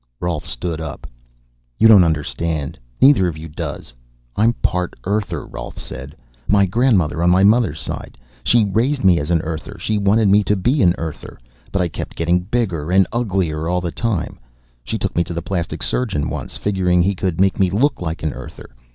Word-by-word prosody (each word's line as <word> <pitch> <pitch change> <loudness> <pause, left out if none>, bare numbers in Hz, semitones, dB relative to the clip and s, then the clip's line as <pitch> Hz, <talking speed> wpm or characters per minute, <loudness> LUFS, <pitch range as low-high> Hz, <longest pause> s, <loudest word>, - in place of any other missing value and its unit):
Rolf 85 -4 -3
stood 80 +6 -3
up. 80 - -7 0.7
"You 115 - +6
don't 105 -5 +8
understand. 80 -1 -2 0.2
Neither 130 -10 +6
of 80 -3 -4
you 80 +1 -8
does. 75 -5 -6 0.4
I'm 115 +3 +3
part 90 -5 -2
Earther," 95 -5 -2
Rolf - - -8
said. 65 +5 -7 0.3
"My 100 -1 +4
grandmother 95 - +2
on 85 - +4
my 90 +2 +4
mother's 105 -7 +3
side. - - -6 0.3
She 120 -3 +4
raised 120 +7 0
me 90 -3 +5
as 75 - -4
an 85 -2 +2
Earther. 80 +5 -6
She 105 0 -1
wanted 105 +2 +3
me 100 +2 +5
to 105 - +2
be 125 +9 +1
an 90 -1 +4
Earther. 80 -2 -7 0.3
But 95 -2 +1
I - - 0
kept 85 - -7
getting 85 +2 +2
bigger 90 -6 -2
and 95 +1 +5
uglier 90 -9 -1
all 90 +1 +1
the 85 -2 -3
time. 110 -6 -2 0.4
She - - -3
took - - -3
me 85 - +3
to 85 -1 -6
a - - -1
plastic 85 -3 -3
surgeon 80 -12 -1
once, - - -5
figuring 90 -3 +1
he 100 +3 +1
could 90 -3 -2
make 95 0 +2
me 95 -2 +3
look 120 +9 +1
like 80 -2 -4
an 75 -3 -1
Earther. 60 0 -10
90 Hz, 195 wpm, -19 LUFS, 80-105 Hz, 0.7 s, don't